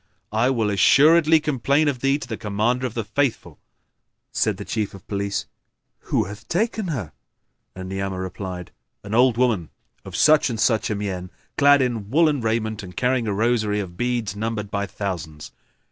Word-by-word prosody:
I 110 +4 +2
will 115 -5 +1
assuredly 155 - +5
complain 145 0 +1
of 135 -3 0
thee 135 +2 +2
to 145 - -8
the 115 - -4
Commander 110 +5 0
of 120 - -10
the 115 - -1
Faithful." 120 +3 -2 0.7
Said - - 0
the - - -7
Chief 105 -3 -3
of 95 - -14
Police, 100 -1 -2 0.6
"Who - - +2
hath 105 +2 -9
taken 215 +2 -1
her?" 115 - -4 0.6
and 95 0 -7
Ni'amah 95 0 -3
replied, 95 -1 -6 0.3
"An 100 +1 -7
old 120 0 +4
woman 115 -10 +1 0.3
of - - -9
such 155 -2 +5
and 115 -3 -4
such 110 0 +2
a 105 - -1
mien, 95 -3 -4 0.3
clad 145 -1 +5
in 115 -5 -3
woollen 150 0 +3
raiment 110 -1 -1
and 90 -2 -11
carrying 125 -2 +1
a 105 - 0
rosary 110 -1 +1
of 90 -4 -6
beads 120 -3 -1
numbered 105 -1 -3
by 100 0 -1
thousands." 85 -7 -5
110 Hz, 175 wpm, -23 LUFS, 100-130 Hz, 0.7 s, assuredly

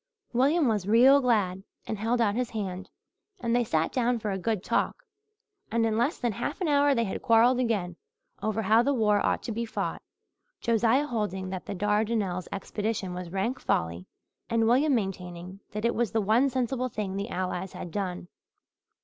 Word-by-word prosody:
William 280 +5 +3
was 210 -4 0
real 255 +6 +6
glad 205 -7 +1 0.2
and 215 - -4
held 230 +3 0
out 215 -3 +2
his 245 +2 -1
hand, 190 -3 -5 0.5
and 235 -4 0
they 245 - +3
sat 160 -7 0
down 245 -1 +1
for 215 -2 -3
a 190 - -1
good 210 0 -1
talk. - - -1 0.7
And 230 0 +2
in 220 -1 +1
less 240 +8 +1
than 240 -2 -1
half 250 +8 -4
an 365 - -1
hour 285 -1 +4
they 235 - +2
had 195 - -4
quarrelled 235 +2 +4
again, 200 -8 -1 0.4
over 220 +1 -1
how 220 +3 +5
the 280 +3 +1
war 210 -3 +2
ought - - 0
to - - -4
be 230 +2 -2
fought, 230 - -3 0.6
Josiah 235 +4 +2
holding 200 -7 -3
that 185 -1 -6
the 200 - -4
Dardanelles 205 -2 0
expedition 200 -1 -3
was 180 -1 -6
rank 195 +8 -2
folly 85 +2 -1 0.4
and 230 -1 +2
William 270 +4 +4
maintaining 185 -3 -4
that 210 +2 -3
it 235 - +2
was 235 -2 -1
the 225 - +2
one 225 +7 +3
sensible 255 0 -1
thing 205 -4 -4
the 200 +3 -3
Allies 185 -1 -3
had 175 - -7
done. 180 -2 -3
220 Hz, 185 wpm, -28 LUFS, 190-240 Hz, 0.7 s, real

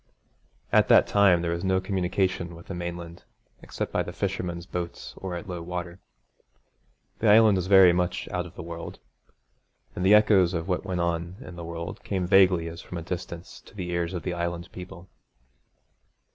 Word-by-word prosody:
At - - +5
that - - +6
time 95 -4 +4
there 85 - -1
was 85 0 -3
no 95 -1 +2
communication 95 -2 -1
with 85 - -13
the - - -6
mainland 85 -1 -6 0.4
except - - -5
by - - +2
the - - -5
fishermen's 85 -1 -3
boats 90 -1 -6
or 95 -2 -5
at 85 - -7
low 90 -2 -5
water. 85 +1 -6 1.2
The 110 - +3
Island 105 -1 +6
was 90 0 -2
very 95 -2 +7
much 90 0 -1
out 90 -2 -3
of 90 - -16
the - - -7
world; 85 0 -7 1.0
and 90 - -3
the 100 +3 +7
echoes 100 -4 +4
of 85 +1 -3
what 90 -2 -1
went 90 -2 -2
on 85 +1 -2
in 90 -9 -10
the 85 - -7
world 85 +1 -6
came 95 -3 -2
vaguely 90 -2 +4
as 85 0 -8
from 90 - -8
a 85 - -5
distance 85 0 -7
to - - -18
the 90 -3 -4
ears 85 +1 -2
of 85 - -4
the 90 - -2
Island 85 0 -3
people. 90 0 -10
90 Hz, 185 wpm, -26 LUFS, 85-95 Hz, 1.2 s, very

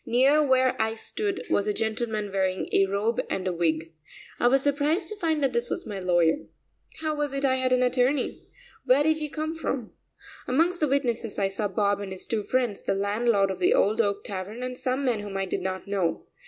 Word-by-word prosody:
Near 275 +6 +4
where 260 -2 +3
I 220 0 0
stood 395 - -3
was 200 - +2
a 210 - 0
gentleman 220 -2 -2
wearing 190 -1 0
a 195 - +4
robe 205 +4 0
and 190 -1 -2
wig. 165 -1 -1 0.5
I 240 - +4
was 270 +2 +3
surprised 300 +5 +1
to 430 - -5
find 320 -6 0
that 265 -3 +1
this 235 0 -1
was - - -3
my 205 -3 -5
lawyer. 175 - +3 0.6
How 310 -1 0
was 295 -2 -2
it 275 0 -1
I 260 -1 +3
had 260 0 0
an 255 0 +4
attorney? 250 +2 0 0.3
Where 265 +2 +4
did 315 +1 +2
he 300 -1 -3
come 310 +2 -3
from? 270 -8 -4 0.5
Amongst 335 +7 +2
the 305 - +2
witnesses, 240 -5 -1
I 195 -1 +1
saw 200 +2 -1
Bob 200 +1 +1
and 200 -1 -6
his 190 - -6
two 225 -2 -1
friends, 240 -1 -1
the - - -1
landlord 200 0 +1
of 190 - -6
the 180 - +4
Old 215 +3 +3
Oak 200 -2 -1
Tavern, 200 +5 -5
and 255 0 -4
some 255 +2 -1
men 240 -4 +1
whom 205 -1 -5
I 195 - -1
did 185 - -3
not 185 0 -3
know. 195 -4 -1
235 Hz, 215 wpm, -26 LUFS, 200-275 Hz, 0.6 s, Near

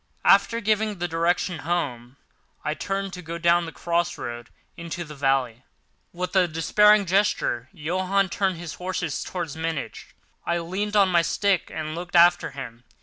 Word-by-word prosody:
After 230 - +5
giving 215 -1 0
the 175 0 -2
direction, 170 +1 0
"Home!" 140 -6 -3 0.5
I 150 - 0
turned 195 +3 -3
to 180 - -7
go 170 0 -6
down 170 0 +3
the - - -6
cross 170 +1 -1
road 120 0 -6 0.3
into 170 +1 -5
the 155 -2 -10
valley. 135 -4 0 0.5
With 180 +1 -5
a 185 -2 +5
despairing 210 +6 +4
gesture, 180 - +1
Johann 185 +5 0
turned 190 -1 0
his 170 -2 -7
horses 180 -4 -3
towards 170 -5 -5
Munich. 160 -2 -5 0.3
I 170 - 0
leaned 190 +5 -3
on 200 -2 +5
my 175 -2 +4
stick 190 +3 0
and 155 0 -4
looked 175 +2 -6
after 175 +1 +5
him. 125 -3 -9
170 Hz, 160 wpm, -24 LUFS, 155-185 Hz, 0.5 s, After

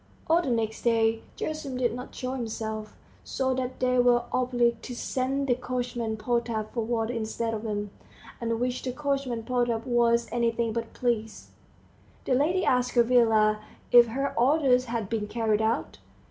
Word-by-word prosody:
All 330 +2 +3
the 280 - -3
next 225 -2 -1
day 225 -1 +2 0.2
Gerasim 305 -4 -4
did 240 -3 +1
not 250 +2 -8
show 255 -1 -3
himself, 220 -3 -5 0.3
so 260 -1 -1
that 255 0 -3
they 250 0 +2
were 245 -1 +4
obliged 240 -2 +1
to 250 - -6
send 265 +3 -1
the 255 - +3
coachman 245 -2 -3
Potap 230 -1 -2
for 235 - -1
water 230 0 -1
instead 225 0 -2
of 215 - -3
him, 205 -1 -3 0.5
at 235 - -2
which 250 +1 -1
the 255 - -3
coachman 275 -4 -2
Potap 240 -2 0
was 235 -1 +2
anything 235 -1 0
but 230 0 -4
pleased. 225 -3 -2 0.7
The - - +1
lady 335 +8 +2
asked 250 0 +1
Gavrila 225 -3 +4 0.3
if 240 -1 +8
her 275 +5 -2
orders 255 -1 +4
had 230 -4 -3
been 215 -1 -2
carried 220 -1 0
out. 225 +5 -1
240 Hz, 160 wpm, -27 LUFS, 225-255 Hz, 0.7 s, if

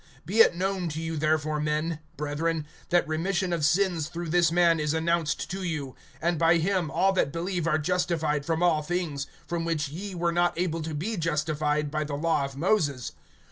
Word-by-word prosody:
(38)Be 205 +5 0
it 200 - +7
known 185 -1 -1
to 155 +1 -4
you 165 0 -3
therefore, 155 0 +1
men, 155 +2 -1 0.2
brethren, 150 +2 -1 0.2
that 175 -2 +3
remission 175 +3 0
of 165 -3 -1
sins 170 -1 +2
through 170 0 -5
this 170 0 +3
man 170 -1 +4
is 150 +1 0
announced 165 -1 0
to 190 +1 -4
you; 150 -7 -3 0.3
(39)and 170 0 +2
by 165 +1 +5
him 180 -1 0
all 195 +4 +2
that 180 -7 +1
believe 175 +1 -2
are 155 -2 +3
justified 160 -3 0
from 165 +3 0
all 165 -3 +3
things, 150 -4 -2 0.2
from 170 -1 -2
which 165 -4 -1
ye 190 +6 -6
were 170 0 +1
not 175 0 +1
able 165 -2 -1
to 155 0 -4
be 205 +9 -2
justified 150 -2 0
by 155 0 -1
the 145 -1 -4
law 150 -1 +1
of 135 0 -5
Moses. 145 - +1
165 Hz, 195 wpm, -27 LUFS, 150-175 Hz, 0.3 s, it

